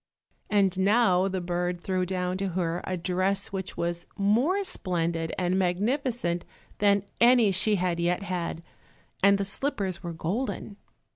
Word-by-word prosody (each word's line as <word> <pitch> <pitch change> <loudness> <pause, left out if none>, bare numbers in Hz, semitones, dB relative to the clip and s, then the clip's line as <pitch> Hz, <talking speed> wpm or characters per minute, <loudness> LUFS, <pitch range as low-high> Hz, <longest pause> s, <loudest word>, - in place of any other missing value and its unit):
And 195 -3 +2
now 195 -2 +4
the 190 -1 -2
bird 175 0 -2
threw 185 0 -1
down 180 0 -1
to 195 - -1
her 170 -1 -1
a 185 - -2
dress 185 +3 0
which 190 -1 -5
was 170 0 -2
more 245 - +2
splendid 165 - -1
and 185 +1 +1
magnificent 200 0 0 0.4
than 200 -1 +3 0.2
any 235 -3 +6
she 210 +3 +2
had 180 -2 0
yet 175 +3 0
had, 175 -3 -3 0.6
and 200 +1 +5
the 200 - -1
slippers 195 -4 -2
were 170 -2 -5
golden. 200 +5 -3
185 Hz, 145 wpm, -27 LUFS, 175-200 Hz, 0.6 s, any